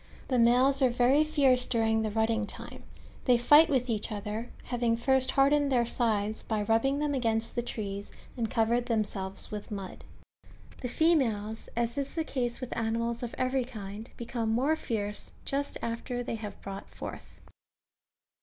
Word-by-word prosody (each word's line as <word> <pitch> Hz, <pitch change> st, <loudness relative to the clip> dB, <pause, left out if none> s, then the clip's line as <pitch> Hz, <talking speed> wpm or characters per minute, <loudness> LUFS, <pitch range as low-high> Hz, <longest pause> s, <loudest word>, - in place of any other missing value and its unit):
The 255 Hz, -2 st, +2 dB
males 255 Hz, +4 st, +5 dB
are 260 Hz, -, +5 dB
very 250 Hz, +5 st, +4 dB
fierce 275 Hz, -5 st, +3 dB
during 225 Hz, -2 st, +2 dB
the 220 Hz, -, -1 dB
rutting 220 Hz, 0 st, 0 dB
time; -, -, -7 dB, 0.4 s
they 250 Hz, -2 st, +5 dB
fight 295 Hz, +7 st, +7 dB
T^ 285 Hz, -, +2 dB
ith 250 Hz, -1 st, +1 dB
each 225 Hz, -1 st, -1 dB
other, 210 Hz, +3 st, -4 dB, 0.2 s
ha^'ing 235 Hz, -2 st, +1 dB
first 260 Hz, +2 st, +2 dB
hardened 280 Hz, +1 st, +3 dB
their 240 Hz, -2 st, +3 dB
sides 220 Hz, -3 st, 0 dB
by 215 Hz, -2 st, -2 dB
rubbing 230 Hz, +6 st, +2 dB
them 295 Hz, 0 st, 0 dB
against 230 Hz, -3 st, 0 dB
the 240 Hz, -, -1 dB
trees, 205 Hz, -4 st, -5 dB, 0.2 s
and 230 Hz, -3 st, -2 dB
covered 235 Hz, +1 st, +1 dB
themselves 205 Hz, -4 st, +1 dB
with 210 Hz, -1 st, -6 dB
mud. 195 Hz, -3 st, -7 dB, 0.8 s
The 250 Hz, -, -2 dB
females, 235 Hz, -8 st, +1 dB
as 235 Hz, +3 st, -1 dB
is 280 Hz, 0 st, -4 dB
the 325 Hz, -, 0 dB
case 245 Hz, -5 st, -3 dB
with 255 Hz, -2 st, -5 dB
animals 230 Hz, +1 st, -1 dB
of 245 Hz, -1 st, -5 dB
every 255 Hz, 0 st, +1 dB
kind, 215 Hz, -2 st, -8 dB
become 235 Hz, -1 st, -3 dB
more 260 Hz, +8 st, +2 dB
fierce 210 Hz, -8 st, -4 dB, 0.2 s
just 280 Hz, +1 st, -2 dB
after 235 Hz, +1 st, -3 dB
they -, -, -4 dB
have 215 Hz, -2 st, -6 dB
brought 195 Hz, 0 st, -7 dB
forth. -, -, -9 dB
235 Hz, 165 wpm, -29 LUFS, 220-260 Hz, 0.8 s, fight